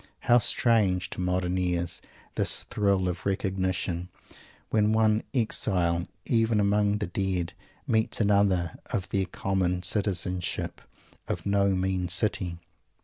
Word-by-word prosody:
How 120 +1 +5
strange 105 -6 +2
to - - -4
modern 90 0 0
ears 90 -1 -1 0.3
this - - +2
thrill 100 -5 0
of 90 0 -4
recognition, 95 -2 -2 0.6
when 105 0 +3
one 110 0 +3
exile, 90 -8 +1 0.2
even 115 -2 +2
among 105 0 +2
the 105 - -2
dead, 90 -1 -2 0.3
meets 110 -1 +1
another, 100 -5 +2
of 95 - -3
their 95 -1 +1
common 90 0 -1
citizenship 95 -2 -1 0.5
of - - -4
"no 100 0 +2
mean 95 -1 -1
city!" 90 -2 0
95 Hz, 120 wpm, -27 LUFS, 90-105 Hz, 0.6 s, How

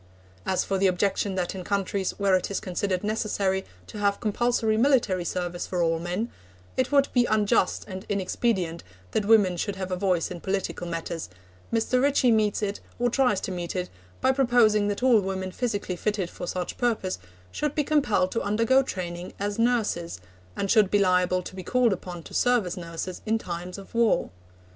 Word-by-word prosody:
As 185 - +2
for 195 -1 -1
the 195 - +4
objection 190 +1 0
that 180 -2 -1
in 190 -2 -6
countries 195 0 -1
where 200 -2 +3
it 185 - 0
is 200 - -1
considered 185 +1 -2
necessary 205 -3 0 0.2
to 210 - -9
have 200 -1 +1
compulsory 225 0 +1
military 225 -7 +3
service 175 0 -3
for 180 -2 0
all 165 0 +1
men, 180 +7 -3 0.4
it 260 +1 0
would 280 -1 +4
be 245 -1 +4
unjust 210 -3 +2
and 190 -1 -6
inexpedient 190 -3 0 0.3
that 210 - 0
women 205 -5 +4
should 200 +3 -2
have 190 -1 -5
a - - +1
voice 180 -3 0
in 175 -2 -6
political 190 -2 -2
matters, 165 - -4 0.4
Mr. 230 +2 +2
Ritchie 275 -3 +4
meets 215 -1 +2
it, 205 0 -2 0.2
or 245 0 +1
tries 250 -6 +2
to - - -3
meet 175 -1 -4
it, 180 -1 -3 0.3
by 260 - +4
proposing 240 -6 +4
that 205 +4 -2
all 250 -4 +6
women 190 -1 -3
physically 205 -4 -2
fitted 195 -1 -2
for 175 - -7
such 180 0 -4
purpose 220 - 0 0.3
should 295 -1 -2
be 300 - +2
compelled 275 -11 +2
to 230 - -1
undergo 230 +6 +3
training 180 -7 -5
as 205 +2 -2
nurses, 220 - 0 0.4
and 195 - -1
should 215 -4 +5
be 205 - +3
liable 185 -1 +2
to 185 - -9
be 190 - -5
called 245 +3 +2
upon 175 -2 -7
to - - -12
serve 245 -4 +3
as 175 - -4
nurses 170 +1 -6
in 220 +1 +2
time 175 -3 -5
of 195 - -12
war. 230 - +2
200 Hz, 190 wpm, -26 LUFS, 180-225 Hz, 0.4 s, all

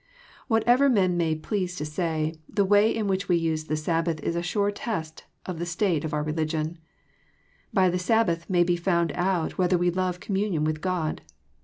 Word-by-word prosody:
Whatever 245 +4 +4
men 190 -7 +3
may 165 -2 +1
please 180 +2 -3
to 150 - -4
say, 155 0 -1 0.2
the 200 - +1
way 205 +2 +5
in 225 -1 -1
which 195 0 -1
we 175 -1 +4
Jiae_the 155 -2 -1
Sabbath 165 +1 -1
is 170 - -1
a 170 - 0
sure 200 +3 0
test 170 -7 -5 0.2
of 180 -3 -5
the 170 - -2
st 185 +3 0
ate 145 - -4
of 160 - -3
i)ur 150 -1 -1
religion. 155 +1 -2 0.9
By 190 -2 +4
the 180 - -1
Sabbath 180 -4 +1
may 175 -2 +4
be 175 0 +1
found 170 -2 +1
out 180 -2 -1
whether 180 0 +3
we 175 0 +2
love 180 0 -1
communion 195 -6 -1
with 155 0 -1
God. 180 -4 -2
175 Hz, 190 wpm, -26 LUFS, 160-195 Hz, 0.9 s, way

